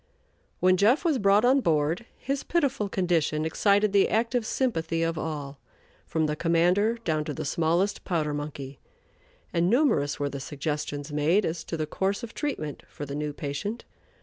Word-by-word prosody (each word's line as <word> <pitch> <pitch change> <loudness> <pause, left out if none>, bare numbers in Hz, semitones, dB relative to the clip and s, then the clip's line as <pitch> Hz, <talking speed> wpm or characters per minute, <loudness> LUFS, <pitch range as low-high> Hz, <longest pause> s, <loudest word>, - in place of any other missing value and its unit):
When 185 0 +4
"Jeff" 235 - +3
was 305 -6 +2
brought 200 +2 +4
on 265 +3 +5
board, 165 - 0
his 275 +1 -2
pitiful 275 -11 0
condition 165 -5 +1
excited 200 +4 +2
the 200 -1 +4
active 230 +1 0
sympathy 165 -10 0
of 165 0 0
all, 145 -3 -5 0.5
from 160 -1 0
the 150 0 -1
commander 175 +7 +2
down 155 -4 0
to - - -4
the 155 - -4
smallest 170 +6 +1
powder 155 -5 -1
monkey, 145 -2 -6 0.7
and 170 +1 +2
numerous 225 - +2
were 145 - 0
the 140 0 -6
suggestions 145 +1 -4
made 160 +7 +2
as 165 +1 -3
to 165 - -4
the 155 - -1
course 195 +8 -1
of 230 - -7
treatment 155 - -3
for 145 - -7
the 140 - -6
new 150 +1 -2
patient. 150 +11 -4
165 Hz, 170 wpm, -27 LUFS, 150-210 Hz, 0.7 s, on